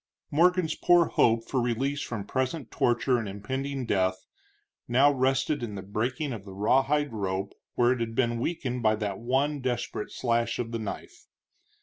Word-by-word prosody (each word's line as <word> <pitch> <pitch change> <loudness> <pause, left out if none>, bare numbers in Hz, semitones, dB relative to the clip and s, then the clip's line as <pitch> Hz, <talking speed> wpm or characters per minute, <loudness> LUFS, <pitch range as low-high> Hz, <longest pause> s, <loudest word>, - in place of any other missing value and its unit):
Morgan's 175 +1 +3
poor 175 -1 +4
hope 115 0 +2
for 130 - 0
release 135 +4 -1
from 105 -4 -4
present 130 +3 -2
torture 120 +1 +2
and 110 -3 -4
impending 130 +7 -4
death 95 -3 0 0.6
now 135 +4 +5
rested 135 +2 +1
in 110 -4 -4
the 95 - -6
breaking 120 +8 -2
of 105 -4 -7
the 95 -1 -10
rawhide 135 +6 +2
rope 95 -2 -2 0.2
where 120 0 +4
it 130 - 0
had 115 -1 -3
been 120 -2 +1
weakened 125 -4 -2
by 110 -1 +3
that 105 -2 -3
one 135 +5 0
desperate 125 -4 -3
slash 115 -1 0
of 115 -1 -3
the 115 - -2
knife. 110 -3 -7
120 Hz, 165 wpm, -28 LUFS, 110-135 Hz, 0.6 s, now